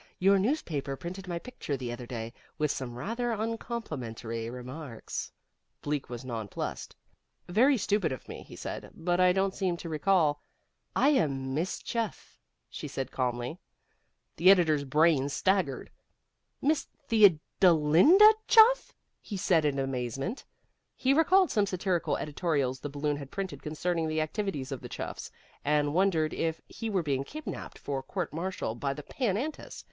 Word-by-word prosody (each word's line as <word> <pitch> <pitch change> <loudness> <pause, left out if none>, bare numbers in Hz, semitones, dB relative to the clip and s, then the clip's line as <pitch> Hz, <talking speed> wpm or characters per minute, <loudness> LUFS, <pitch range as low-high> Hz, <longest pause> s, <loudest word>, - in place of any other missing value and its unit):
Your 195 +1 +4
newspaper 170 - -1
printed 180 +6 -7
my 175 -1 -2
picture 170 - -5
the 125 -2 -4
other 120 0 -7
day, 115 -1 -5 0.2
with 150 -2 +1
some 120 -3 -5
rather 235 - -2
uncomplimentary 150 - -4
remarks." 125 0 -6 0.5
Bleak 145 -1 -2
was 120 +1 -7
nonplussed. 115 -5 -5 0.5
"Very 250 +9 +4
stupid 200 - +1
of 130 - -6
me," - - -8
he - - -12
said, - - -6
"but 175 +2 0
I 180 0 +6
don't 190 +1 +1
seem 185 -4 -1
to 170 - -7
recall 155 -2 +2 0.3
" - - -48
"I - - +7
am 135 - +1
Miss 165 +6 -1
Chuff," 230 -2 -4 0.3
she - - -7
said 135 -1 -4
calmly. 125 +5 -2 0.8
The 185 - +6
editor's 160 -7 +5
brain 150 0 +3
staggered. 185 -4 0 0.7
"Miss 300 +2 +2 0.2
Theodolinda 190 - +6
Chuff?" 470 +2 +6 0.3
he 205 - -6
said, 170 -4 +3
in 145 -2 +1
amazement. 135 - -3 0.5
He 265 +1 +2
recalled 360 +5 +4
some 205 -3 +2
satirical 185 -2 0
editorials 145 -4 -1
the 145 - -5
Balloon 145 +1 -1
had 140 -2 -8
printed 195 +1 -5
concerning 165 +1 -1
the 155 0 -1
activities 155 -5 -3
of 135 - -4
the - - -8
Chuffs, - - -6 0.3
and 145 0 +2
wondered 165 -4 +2
if 160 -1 -1
he 225 - -5
were 190 -4 0
being 135 -3 0
kidnaped 310 - -7
for 140 -2 -3
court 135 - -4
martial 170 -7 -3
by 135 +4 -2
the 150 - -8
Pan 210 - -1
Antis. 295 +6 -5
160 Hz, 150 wpm, -29 LUFS, 135-195 Hz, 0.8 s, I